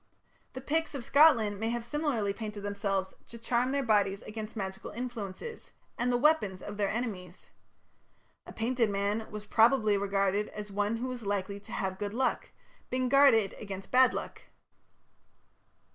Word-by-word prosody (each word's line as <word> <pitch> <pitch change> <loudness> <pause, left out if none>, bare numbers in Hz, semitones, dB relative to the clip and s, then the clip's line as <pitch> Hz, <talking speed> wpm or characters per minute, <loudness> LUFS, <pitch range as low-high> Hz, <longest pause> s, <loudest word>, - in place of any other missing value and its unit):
The 260 - -6
Picts 320 +3 -1
of 250 -4 -4
Scotland 235 -10 +5
may 225 +1 -1
have 235 0 -3
similarly 240 -7 -1
painted 210 -1 -6
themselves 200 -2 -2
to 235 - -10
charm 240 +2 0
their 280 +1 0
bodies 205 -4 +2
against 215 +1 -7
magical 190 -2 -5
influences 240 - -6 0.3
and 245 +1 0
the 245 - +2
weapons 240 -10 +2
of 205 0 -7
their 200 -2 +1
enemies. 200 -6 -5 1.0
A - - -8
painted 230 0 0
man 205 +2 -1
was 210 0 -7
probably 220 -1 +4
regarded 200 +1 0
as 210 -1 -8
one 205 +2 0
who 240 +3 -3
was 250 -1 -5
likely 200 0 -2
to 200 - -14
have 190 -1 -3
good 205 +1 -4
luck, 260 +1 0 0.4
being 255 0 0
guarded 250 -7 +5
against 195 -2 -7
bad 255 0 +6
luck. - - -6
215 Hz, 160 wpm, -30 LUFS, 200-250 Hz, 1.0 s, bad